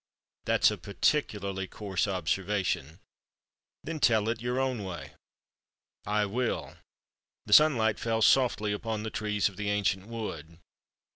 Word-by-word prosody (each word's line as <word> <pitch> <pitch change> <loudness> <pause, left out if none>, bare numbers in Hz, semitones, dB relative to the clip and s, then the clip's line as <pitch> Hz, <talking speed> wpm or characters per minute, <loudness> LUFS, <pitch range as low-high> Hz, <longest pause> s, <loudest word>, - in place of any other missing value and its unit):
"That's - - +4
a - - -5
peculiarly 100 -9 -1
coarse 95 -3 -2
observation." 90 -4 -1 0.9
"Then 160 0 -5
tell 110 -5 +3
it 115 -1 -2
in - - -11
your 125 +1 -1
own 130 -5 -1
way." 90 -3 -7 0.9
"I 105 0 +1
will. 120 +4 -2 0.7
The 105 - 0
sunlight 115 -6 +5
fell 115 -1 0
softly 110 -2 +3
upon 110 0 -3
the 110 - -4
trees 105 -1 0
of 100 - -9
the 105 -1 -2
ancient 100 -1 0
wood." 85 -9 -6
105 Hz, 135 wpm, -29 LUFS, 95-115 Hz, 0.9 s, sunlight